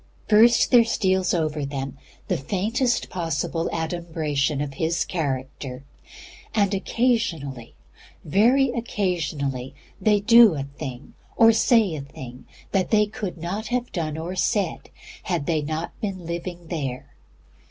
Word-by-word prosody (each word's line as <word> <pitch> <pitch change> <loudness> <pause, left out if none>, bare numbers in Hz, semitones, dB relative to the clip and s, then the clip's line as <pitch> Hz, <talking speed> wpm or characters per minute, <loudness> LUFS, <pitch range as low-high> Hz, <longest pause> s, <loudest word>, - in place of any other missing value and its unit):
First 230 +2 +5
there 240 -2 +8
steals 190 -4 +1
over 155 -3 -1
them 135 -1 -4 0.3
the - - +1
faintest 215 - 0
possible 165 -1 -2
adumbration 160 -3 -1
of 145 -1 -3
His 160 +4 0
character, 135 -4 -4 0.7
and 200 -2 +2
occasionally, 190 - -1 0.5
very 240 - +4
occasionally, 155 - -2 0.3
they 210 -2 +4
do 225 -2 +7
a 140 - -2
thing 140 -2 -8 0.2
or 225 0 +7
say 225 -4 +3
a 150 - -4
thing 130 -2 -10 0.3
that 190 -2 +1
they 210 -1 +4
could 205 -3 -6
not 185 +7 -4
have 245 0 -2
done 155 -3 -3
or 170 +3 -4
said 190 -2 -1 0.3
had 170 -6 -2
they 160 -1 +1
not 155 +3 -3
been 190 -5 -4
living 170 0 -6
there. 135 -7 -4
170 Hz, 130 wpm, -24 LUFS, 145-210 Hz, 0.7 s, there